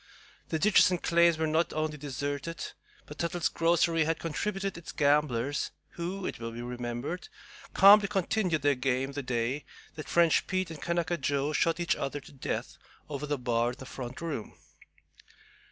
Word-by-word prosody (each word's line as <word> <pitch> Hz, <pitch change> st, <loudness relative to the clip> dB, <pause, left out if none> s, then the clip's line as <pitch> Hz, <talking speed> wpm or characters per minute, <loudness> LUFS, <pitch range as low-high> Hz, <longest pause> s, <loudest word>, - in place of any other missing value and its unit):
The 160 Hz, -, 0 dB
ditches 200 Hz, +5 st, +5 dB
and 180 Hz, -2 st, 0 dB
claims 170 Hz, -1 st, +4 dB
were 160 Hz, -, 0 dB
not 160 Hz, +2 st, +1 dB
only 155 Hz, 0 st, -1 dB
deserted, 145 Hz, +3 st, -4 dB, 0.3 s
but 150 Hz, -, -11 dB
"Tuttle's 170 Hz, 0 st, 0 dB
grocery" 165 Hz, -1 st, +2 dB
had 165 Hz, 0 st, 0 dB
contributed 195 Hz, +4 st, -3 dB
its 170 Hz, -1 st, -8 dB
gamblers, 145 Hz, -3 st, +1 dB, 0.2 s
who, 180 Hz, +3 st, -5 dB
it -, -, -4 dB
will 115 Hz, 0 st, -5 dB
be 120 Hz, +1 st, -6 dB
remembered, 125 Hz, -, -4 dB, 0.5 s
calmly 200 Hz, +1 st, +8 dB
continued 190 Hz, -5 st, 0 dB
their 145 Hz, 0 st, +4 dB
game 130 Hz, +1 st, -1 dB
the 140 Hz, +1 st, -4 dB
day 125 Hz, +2 st, -1 dB, 0.3 s
that 155 Hz, -, -8 dB
French 170 Hz, -2 st, +4 dB
Pete 185 Hz, -3 st, -1 dB
and 160 Hz, -, -8 dB
Kanaka 170 Hz, 0 st, 0 dB
Joe 140 Hz, +2 st, 0 dB
shot 165 Hz, +2 st, +2 dB
each 175 Hz, -, +1 dB
other 140 Hz, +1 st, -3 dB
to -, -, -15 dB
death 135 Hz, -, -4 dB, 0.3 s
over 145 Hz, 0 st, -4 dB
the 145 Hz, 0 st, 0 dB
bar 120 Hz, -1 st, 0 dB
in -, -, -13 dB
the 130 Hz, -, -9 dB
front 130 Hz, +1 st, -7 dB
room. 155 Hz, -10 st, -4 dB
155 Hz, 170 wpm, -29 LUFS, 135-170 Hz, 0.5 s, calmly